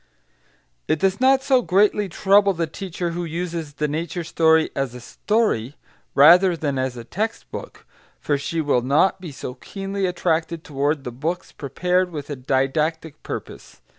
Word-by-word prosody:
It - - +2
does 195 +7 0
not 265 0 +4
so 265 -2 +3
greatly 205 0 +2
trouble 200 +3 +4
the 165 -1 -1
teacher 175 +1 -5
who 175 +1 -3
uses 165 -2 -4
the 150 0 -1
nature 170 +4 -3
story 160 -1 +3
as 135 -3 -2
a - - -7
story, 145 - -1 0.4
rather 175 +5 +7
than 140 -4 -2
as 130 -1 -2
a 120 - -7
text 215 - -4
book, - - -9 0.3
for 145 - 0
she 155 +4 -2
will 145 -5 +2
not 145 +9 +2
be 170 -4 -7
so 130 -2 -7
keenly 195 +7 -4
attracted 170 -2 -1
toward 145 -2 -1
the 125 - -5
books 160 +9 -4
prepared 180 +6 0
with 150 -3 -7
a - - -2
didactic 140 +4 -1
purpose. - - -8
165 Hz, 165 wpm, -22 LUFS, 145-185 Hz, 0.4 s, rather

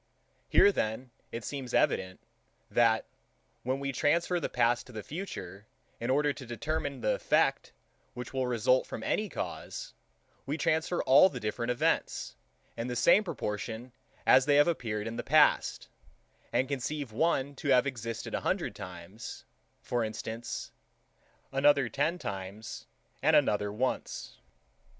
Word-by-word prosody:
Here 205 - +6
then 120 - -2 0.2
it 115 - -5
seems 130 -2 -4
evident, 95 0 +1 0.5
that, 115 -2 +3 0.6
when 130 +2 -1
we 140 0 -2
transfer 170 +6 +1
the - - -2
past 120 0 +1
to - - -12
the 110 -3 -6
future, 105 - -7 0.3
in 120 - -3
order 145 +2 +3
to 135 - -9
determine 140 +3 -3
the 105 - +2
effect, - - +1 0.4
which 125 +1 -7
will 130 -1 0
result 125 +2 +2
from - - -6
any 215 -1 0
cause, - - -6 0.5
we 145 +3 -1
transfer 160 +2 +1
all 140 +8 +7
the 130 - -6
different 115 +2 -2
events, 150 +7 0 0.4
in 115 +1 -3
the 125 - -3
same 180 - +5
proportion 115 - -4 0.3
as 130 +1 +6
they 145 - +5
have 145 +2 +6
appeared 110 -10 -1
in 115 +1 -4
the - - -3
past, - - +3 0.6
and 130 - +1
conceive 140 -1 -3
one 140 +2 +1
to - - -5
have 130 -2 +5
existed 115 -5 -4
a - - -1
hundred - - -1
times, 90 +7 -9 0.4
for 120 -1 0
instance, 110 +1 -5 0.8
another 140 -2 +4
ten 150 +7 0
times, 100 - -6 0.3
and - - +4
another 105 -1 +3
once. 125 +5 -3
125 Hz, 145 wpm, -30 LUFS, 115-145 Hz, 0.8 s, all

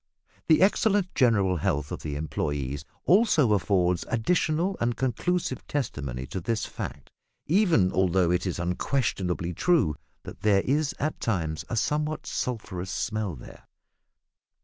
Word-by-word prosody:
The 160 +3 +5
excellent 200 -1 +2
general 100 -8 +3
health 75 -2 -1
of - - -5
the 75 -2 -4
employes 75 -2 -3 0.2
also 170 - +4
affords 90 -3 +1
additional 165 - +1
and 120 0 0
conclusive 130 +4 -1
testimony 70 - -3
to 95 - -5
this 110 +3 -1
fact - - -7 0.3
even 165 - +3
although 90 -1 +2
it 90 +2 0
is 90 - -2
unquestionably 90 -1 -1
true 145 - +2 0.3
that - - -10
there 100 -2 +4
is 145 +4 0
at 155 +2 -2
times 80 -8 -2
a - - -2
somewhat 150 +6 -1
sulphurous 100 -7 -4
smell 105 -1 -2
there. - - -13
105 Hz, 130 wpm, -27 LUFS, -, 0.3 s, The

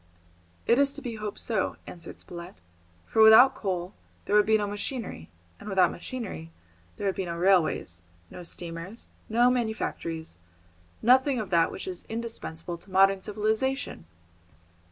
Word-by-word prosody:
"It 235 - +4
is 280 0 +3
to 290 - -9
be 235 -4 -5
hoped 210 -1 -5
so," 215 -5 -1
answered 170 -2 -10
Spilett, 175 0 -9 0.5
"for 220 - +2
without 220 +5 +9
coal 185 -5 -3 0.3
there 205 - +1
would 210 0 +5
be 220 0 +5
no 210 - -1
machinery, 205 - -4 0.3
and 210 - -8
without 190 -2 +4
machinery 215 - -6 0.5
there 205 - -4
would 195 - +1
be 190 - -3
no 170 -1 -4
railways, 170 - +2 0.3
no - - -9
steamers, 170 +4 -7 0.2
no 240 +3 +4
manufactories, 215 - -3 0.6
nothing 260 +2 +4
of 210 -4 -5
that 165 -1 +3
which - - -7
is 180 -2 -6
indispensable 200 -7 -5
to 195 - -16
modern 195 +1 +4
civilisation!" 215 - -2
205 Hz, 150 wpm, -27 LUFS, 175-230 Hz, 0.6 s, without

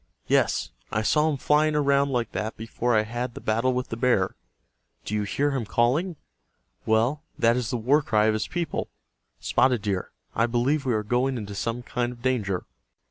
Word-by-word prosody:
Yes, - - +1 0.2
I 110 - 0
saw 150 +7 +3
him 145 - -1
flying 150 +3 +2
around 140 -1 +3
like 120 -4 -1
that 110 +1 -3
before 115 +2 -1
I 105 - +3
had 120 +2 -4
the - - -6
battle 115 +4 +1
with 125 0 -2
the - - -3
bear. 115 -6 +1 0.7
Do - - -4
you 105 - +1
hear 140 +8 0
him 135 -3 -1
calling? 130 - +1 0.7
Well, 115 +7 +2 0.2
that 115 +1 +4
is 125 -2 -1
the 125 - -1
war 135 +7 +3
cry 110 -6 +2
of 110 - +3
his 110 0 -1
people. 170 -2 -3 0.5
Spotted 125 -5 +2
Deer, 95 -3 -2 0.2
I 115 +2 +2
believe 130 +5 +1
we 120 - +2
are 105 - 0
going 125 +4 0
into 105 -3 -6
some 115 +4 -3
kind 120 0 -2
of 120 -1 -13
danger." 105 -8 0
120 Hz, 190 wpm, -26 LUFS, 110-135 Hz, 0.7 s, that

